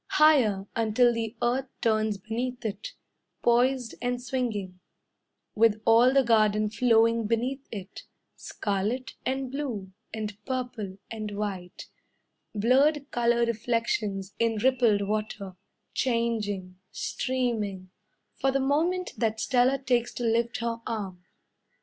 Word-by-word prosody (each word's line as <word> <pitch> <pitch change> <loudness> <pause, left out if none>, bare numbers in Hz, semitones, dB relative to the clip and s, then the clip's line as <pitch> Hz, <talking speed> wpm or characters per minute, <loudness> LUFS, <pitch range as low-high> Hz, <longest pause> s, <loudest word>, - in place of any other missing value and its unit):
Higher, 250 -11 +4
Until 230 +2 +3
the 230 0 -3
earth 255 +3 +1
turns 215 -2 +1
beneath 235 +5 -4
it; 210 -1 -4 0.5
Poised 245 0 +2
and 245 0 -1
swinging, 225 -8 -3 0.7
With 220 -1 +3
all 230 +3 +6
the 270 0 +4
garden 215 -2 +3
flowing 230 -1 +3
beneath 250 +5 -1
it, 195 -3 -8 0.3
Scarlet, 210 +5 -2 0.2
and 265 -1 -2
blue, 245 -10 -4 0.2
and 210 -1 -5
purple, 245 -7 -4
and 215 -2 -4
white 190 -4 -5 0.7
Blurred 275 +7 +3
colour 235 0 +2
reflections 225 -4 -1
in 230 -1 +2
rippled 235 -2 +3
water 210 -2 -3 0.4
Changing 215 -7 -1
streaming 220 -8 -2 0.5
For 270 - +2
the 275 - +1
moment 330 +7 +1
that 220 -1 0
Stella 255 +2 +3
takes 245 -3 0
to 245 - -4
lift 235 0 +1
her 230 0 -2
arm. 195 -5 -4
230 Hz, 115 wpm, -27 LUFS, 210-250 Hz, 0.7 s, all